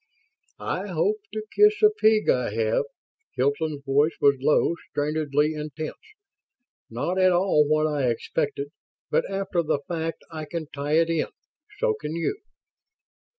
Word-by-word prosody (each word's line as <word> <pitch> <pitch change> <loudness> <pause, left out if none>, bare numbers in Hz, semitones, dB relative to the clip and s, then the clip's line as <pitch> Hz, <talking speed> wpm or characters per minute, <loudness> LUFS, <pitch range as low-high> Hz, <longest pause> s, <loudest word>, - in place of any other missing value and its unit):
"I - - -3
hope 425 +1 +1
to 215 0 -5
kiss 420 0 +5
a 425 - +8
pig 220 - +3
I 125 -4 +2
have!" 110 - +1 0.5
Hilton's 145 +2 0
voice 145 +3 +2
was 140 0 +5
low, 150 +4 +3 0.2
strainedly 150 0 0
intense. 150 0 -5 1.0
"Not 145 +11 -2
at 185 0 +5
all 175 -4 +3
what 155 +1 +2
I 145 -5 +1
expected, 145 +4 -2 0.4
but - - +1
after 195 -2 -1
the 155 -3 -1
fact 165 -1 -3
I 155 -1 -5
can 165 +1 -5
tie 145 +1 -2
it 165 +1 +3
in. 165 -2 0 0.5
So 485 -1 +2
can 165 - -5
you." 170 - -2
155 Hz, 145 wpm, -25 LUFS, 145-180 Hz, 1.0 s, a